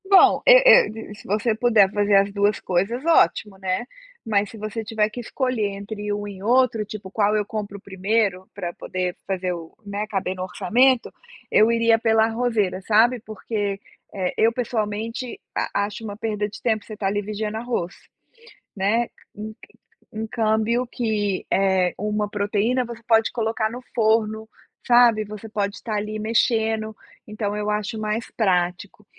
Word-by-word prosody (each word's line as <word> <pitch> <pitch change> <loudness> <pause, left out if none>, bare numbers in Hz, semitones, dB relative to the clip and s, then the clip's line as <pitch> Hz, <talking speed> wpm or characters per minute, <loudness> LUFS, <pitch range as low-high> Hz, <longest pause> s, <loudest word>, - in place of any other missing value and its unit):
Bom, 390 -2 +6
eu - - +9 0.3
e 220 -1 -9
e - - -8
se - - -14
você 215 +3 +1
puder 220 -4 +4
fazer 205 -1 +2
as 200 +1 +4
2 205 0 +1
coisas 200 - -1
ótimo, 215 -11 +3
né, 190 +3 -2 0.4
mas 205 -2 +1
se 225 - -11
você 215 +1 -4
tiver 215 0 0
que 215 - -8
escolher 245 -2 -1
entre 205 +1 -5
um 205 0 -4
e 195 -2 -9
outro, 235 -1 +3
tipo 205 -2 -8
qual 210 0 +2
eu 210 -1 +1
compro 205 -2 -5
primeiro 195 0 -1
para 175 -1 -5
poder 180 -1 -3
fazer 185 -2 -1
o, 165 -2 -9
né, 205 +1 -3
caber 190 -3 -2
no 185 - -4
orçamento, 250 +6 +2 0.4
eu 220 +2 +5
iria 230 -1 +4
pela 220 -1 +3
arrozeira, 225 -5 0
sabe, 225 +5 +3
porque, 210 -2 -3 0.3
eh, 185 -2 -2
eu 225 +1 +4
pessoalmente 230 0 -3 0.2
a 200 - 0
acho 210 +2 -8
uma 205 -2 -6
perda 210 -2 -2
de 210 - -11
tempo 220 -3 0
você 220 - -9
estar 210 -2 -2
ali 205 +1 0
vigiando 215 +1 -4
arroz, 225 -7 -3 0.8
né, 215 +5 +1 0.3
um 215 +1 -7
ca 220 - -18 0.5
um 220 +1 -3
câmbio 220 +2 +1
que 215 -5 -1
é 190 -2 +2
uma 210 0 -1
proteína 210 +5 0
você 235 -1 -9
pode 225 -1 +3
colocar 225 -1 -1
no 245 +3 -7
forno, 220 -1 +1 0.4
sabe, 240 -3 +5
você 210 +1 -9
pode 205 -1 -2
estar 220 -3 -5
ali 210 +1 -3
mexendo, 220 0 +1 0.3
então 210 -1 -3
eu 210 0 -2
acho 210 +1 -2
mais 215 +2 -3
prático, 185 0 -1
215 Hz, 165 wpm, -23 LUFS, 200-225 Hz, 0.8 s, eu